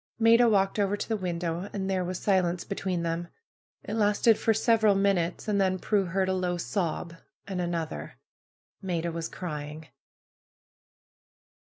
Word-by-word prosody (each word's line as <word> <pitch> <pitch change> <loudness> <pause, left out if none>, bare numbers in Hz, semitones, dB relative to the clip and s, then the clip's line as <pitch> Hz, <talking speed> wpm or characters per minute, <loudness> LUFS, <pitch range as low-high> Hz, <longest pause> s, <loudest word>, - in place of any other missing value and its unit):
Maida 230 +1 +6
walked 195 -1 +2
over 205 0 +1
to - - -4
tlie - - -5
window. 175 +1 -2
And 195 -2 -2
there 190 -1 0
was 180 0 -3
silence 180 -3 +1
between 185 -4 -2
them. 170 +1 -2 0.6
It 205 - -5
lasted 215 +1 +4
for 225 - +1
several 220 -1 +3
minutes. 195 -3 +1
And 205 -2 +2
then 185 -1 +2
Prudence 190 -2 0
heard 190 -1 +2
a 190 - +1
low 180 -1 -1
sob, 170 -2 -2 0.3
and 185 -2 -2
another. 170 -2 -4 0.7
Maida 170 -3 -2
was 165 0 -4
crying. 150 -3 -6
185 Hz, 150 wpm, -28 LUFS, 170-205 Hz, 0.7 s, Maida